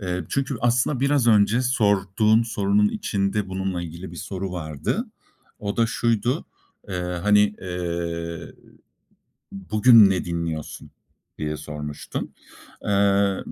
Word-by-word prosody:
Eee, 90 -3 -3
çünkü 140 -2 -1
aslında 125 +3 +1
biraz 140 -2 +2
önce 110 +2 +4
sorduğum 110 -2 +2
sorunun 105 -2 +2
içinde 100 0 -1
bununla 95 -1 -3
ilgili 85 +2 -8
bir 85 - -10
soru 95 +2 -5
vardı. 80 - -3 0.5
O 100 -4 -4
da 115 -1 +3
şuydu. 115 +1 0 0.4
Eee, 95 - -4 0.3
hani, 105 0 +4
eee, 85 -2 -4 1.0
"Bugün 105 +2 +5
ne 95 -2 0
dinliyorsun?" 85 -3 -5 0.5
diye 75 0 -3
sormuştun. 75 -1 -6 0.5
Eee, 100 -1 +2
100 Hz, 110 wpm, -23 LUFS, 90-110 Hz, 1.0 s, Bugün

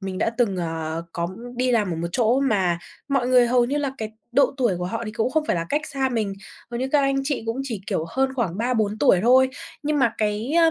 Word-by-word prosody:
mình 190 -1 -4
đã 225 - +1
từng, 205 -6 +2
ờ, 165 -1 -3
có 170 0 -2 0.3
đi 250 0 +1
làm 210 -6 +2
ở - - -3
một 170 +1 -3
chỗ 240 +3 +2
mà 190 -10 +1 0.3
mọi 270 -3 +1
người 250 -1 +5
hầu 245 0 +3
như 280 +4 -1
là 280 -2 -1
cái 220 -1 -4 0.2
độ 275 +2 +3
tuổi 235 -9 +1
của 180 - -3
họ 225 +6 -3
thì 215 - -4
cũng 235 +2 0
không 315 +1 +1
phải - - +1
là 165 - -2
cách 295 - +1
xa 270 -2 -1
mình, 220 -5 -1 0.4
hầu 240 +1 -3
như 260 - -1
các 295 - +5
anh 275 0 +1
chị 280 -4 -1
cũng 230 +4 -2
chỉ, 230 -8 -4
kiểu, 160 - -1
hơn 265 +5 0
khoảng 200 -7 -2
3-4 220 -3 0
tuổi 180 - +5
thôi, 260 +3 +5 0.3
nhưng 295 0 0
mà 235 -3 +2
cái, 215 +5 -1
ơ, 330 -1 +6
235 Hz, 260 wpm, -23 LUFS, 195-265 Hz, 0.4 s, ơ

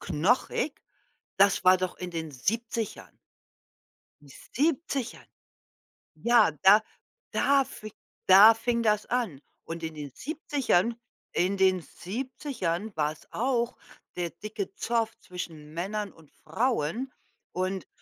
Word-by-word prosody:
knochig, 245 - 0 0.6
das 200 -1 +4
war 185 0 +7
doch 185 -1 -3
in 180 -1 -6
den 160 -2 -4
70ern. 225 - -3 1.0
Die 145 - -17 0.3
70ern 280 -3 -1 0.9
Ja, 235 -7 +4
da 205 +3 +8 0.5
da 275 -1 +3
fi 215 -5 -10 0.4
da 200 +4 +10
fing 235 +1 -1
das 210 -1 +2
an. 225 - -1 0.2
Und 165 0 -6
in 160 -1 -4
den 145 -2 -7
70ern 265 - 0 0.4
in 190 +3 +1
den 185 -2 +3
70ern 220 - -4
war's 150 0 -2
auch 240 0 0 0.4
der 175 -1 -2
dicke 215 - -6
Zoff 230 -4 -1
zwischen 160 -4 -8
Männern 200 +4 -3
und 160 -3 -20
Frauen. 230 - -1 0.4
Und 185 +1 -2
210 Hz, 115 wpm, -28 LUFS, 175-240 Hz, 1.0 s, da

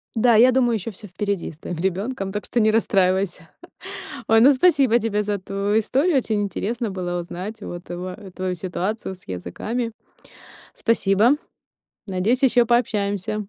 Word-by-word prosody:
Да, 230 0 +4
я 250 +4 +7
думаю, 245 -2 +2
ещё 220 +2 -4
всё 210 +2 -12
впереди 200 -1 -3
с 155 - -18
твоим 175 - -6
ребёнком, 195 +3 -2
так 210 +1 -4
что 240 - -1
не 215 0 +4
расстраивайся. 190 -5 +1 0.8
Ой, 225 0 +6
ну, 270 +5 +8
спасибо 265 -5 +4
тебе 210 -2 -1
за 205 -1 -2
твою 200 +3 -1
историю. 275 - +1
Очень 220 -5 +1
интересно 220 +3 -3
было 175 -2 -3
узнать 190 +6 -7
вот 175 0 -7
туа 180 +1 -6 0.2
твою 185 -1 -2
ситуацию 190 +3 -3
с 180 - -16
языками. 220 - -4 0.8
Спасибо. 220 +1 +3 0.8
Надеюсь, 205 +8 0
ещё 245 -2 +5
пообщаемся. 210 -3 0
205 Hz, 150 wpm, -22 LUFS, 185-230 Hz, 0.8 s, ну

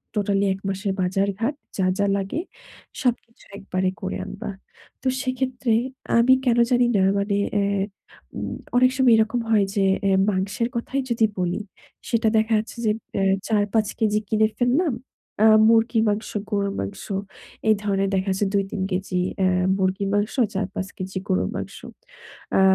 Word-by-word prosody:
Totally 200 -1 +1
এক 195 - -12
মাসের 195 0 -2
বাজারঘাট 200 +8 0 0.2
যা, 190 - +1
যা 200 - +2
লাগে 195 +11 -3 0.6
সবকিছু 235 -2 -2
একবারে 185 -2 -1
করে 190 - -3
আনবা। 215 +2 -6 0.5
তো - - -1
সেক্ষেত্রে 255 -2 -1 0.5
আমি 245 +3 +6
কেন 240 -1 +3
জানি 245 0 +4
না 190 - +3 0.2
মানে 200 0 0 0.2
এ্যা 200 -1 +1 0.5
উম - - -4 0.2
অনেক 255 +1 +5
সময় 260 -3 +5
এরকম 220 +2 +1
হয় 210 -3 +4
যে 200 -2 +2 0.2
এ্যা 195 -1 +3
মাংসের 195 +4 -1
কথাই 260 +3 -1
যদি 225 -1 +3
বলি। 180 +3 -1 0.5
সেটা 230 -2 +2
দেখা 220 +1 +2
যাচ্ছে 220 +2 -7
যে 215 - +4 0.3
এ্যা 195 - +2 0.2
৪-৫ 215 0 +1
কেজি 215 -1 +2
কিনে 215 +1 +3
ফেললাম। 260 +5 +2 0.5
আ - - +8 0.2
মুরগির 225 0 +3
মাংস, 210 +2 -2 0.2
গরুর 200 -2 0
মাংস 95 - -6 0.7
এই 215 - +6
ধরণের 195 -1 +1
দেখা 190 +1 0
যাচ্ছে 190 +2 0
২-৩ 195 0 -1
কেজি 185 -1 -1 0.2
এ্যা 185 -1 +3 0.3
মুরগির 190 +1 0
মাংস, 205 +2 0 0.2
৪-৫ 195 -1 -3
কেজি 190 0 -4
গরুর 185 - +1
মাংস। - - -5 0.8
আ - - +5
205 Hz, 155 wpm, -23 LUFS, 195-230 Hz, 0.8 s, আ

